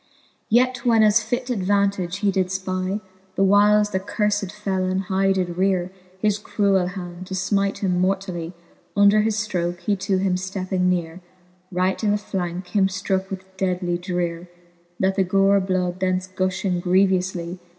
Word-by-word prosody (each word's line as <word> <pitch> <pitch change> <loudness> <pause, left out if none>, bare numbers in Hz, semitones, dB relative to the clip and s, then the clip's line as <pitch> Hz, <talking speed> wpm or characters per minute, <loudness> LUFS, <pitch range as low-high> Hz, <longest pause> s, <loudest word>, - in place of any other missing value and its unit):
Yet 250 +1 +2
when 230 -2 +4
as 215 +1 +5
fit 245 +3 -3
advantage 200 -3 0
he 200 - +4
did 190 -1 +1
fpy, 185 +1 -2 0.3
The 195 - +2
whiles 205 +1 +4
the 190 - 0
curfed 205 0 -1
felon 190 -3 -1
high 195 0 +1
did 180 -2 -1
reare 185 -1 +1 0.3
His 210 0 +1
cruell 200 -3 +1
hand, 180 -1 -7
to 190 - -4
fmite 195 +1 0
him 180 -3 0
mortally, 185 -3 -2 0.4
Under 205 +1 +6
his 215 0 0
ftroke 175 -2 -2
he 200 +3 0
to 190 0 0
him 185 -1 +1
fi:epping 185 0 -1
neare, 175 -1 -2 0.5
Right 185 +3 0
in 210 - +2
the - - +2
flanke 180 -3 -4
him 195 -2 +3
ftrooke 190 0 -2
with 190 0 -9
deadly 180 -2 -1
dreare, 175 -1 -3 0.5
That 190 +1 +1
the 195 - +4
gore 195 +2 +3
bloud 185 -1 -1
thence 185 -1 0
guihing 185 -1 -1
grievoufly. 185 -1 +1
190 Hz, 160 wpm, -23 LUFS, 180-200 Hz, 0.5 s, Under